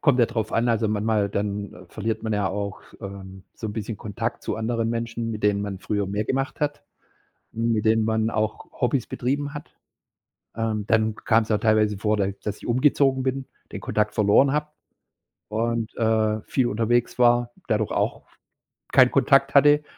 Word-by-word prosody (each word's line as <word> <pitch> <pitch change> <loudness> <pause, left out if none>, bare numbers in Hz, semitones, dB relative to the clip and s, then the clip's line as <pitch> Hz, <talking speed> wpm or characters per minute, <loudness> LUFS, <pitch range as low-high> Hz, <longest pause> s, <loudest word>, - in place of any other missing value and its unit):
kommt 140 -5 +3
ja 120 - +5
drauf 110 -2 -3
an. 120 +1 +2
Also, 110 -2 +1
manchmal 105 -1 +1
dann 100 -2 -4
verliert 110 +3 -3
man 110 -1 -2
ja 100 -2 +1
auch, 100 +1 -4 0.2
ähm, 95 -1 -9
so 110 - -6
'n 105 - -4
bisschen 110 0 -4
Kontakt 115 +3 -4
zu - - -3
anderen 115 0 -1
Menschen, 115 0 -3
mit 110 -1 -5
denen 100 -1 +2
man 100 -2 -4
früher 100 +1 -2
mehr 100 +2 -2
gemacht 135 +4 -2
hat, 145 -1 -1 0.7
mit 115 -1 0
denen 110 0 +3
man 110 0 +1
auch 110 -1 -2
Hobbys 125 0 +1
betrieben 145 +4 -2
hat. 145 +1 -9 0.8
Ähm, 110 -2 -2
dann 110 -1 +2
kam's 110 0 +1
auch 105 - +2
teilweise 105 -2 +2
vor, 105 +1 0
d 100 0 -1
dass 105 -1 -3
ich - - -10
umgezogen 130 +1 +3
bin, 130 0 -2 0.3
den - - -6
Kontakt 105 - 0
verloren 110 +6 +4
habe 150 0 0 0.8
und, 115 +1 -2
äh, 110 -1 +1
viel 125 +3 0
unterwegs 120 +2 0
war, 120 -1 +4 0.2
dadurch 110 -1 0
auch - - -1 0.7
keinen - - +6
Kontakt 140 0 +3
hatte. 145 +1 +6
110 Hz, 175 wpm, -24 LUFS, 105-120 Hz, 0.8 s, keinen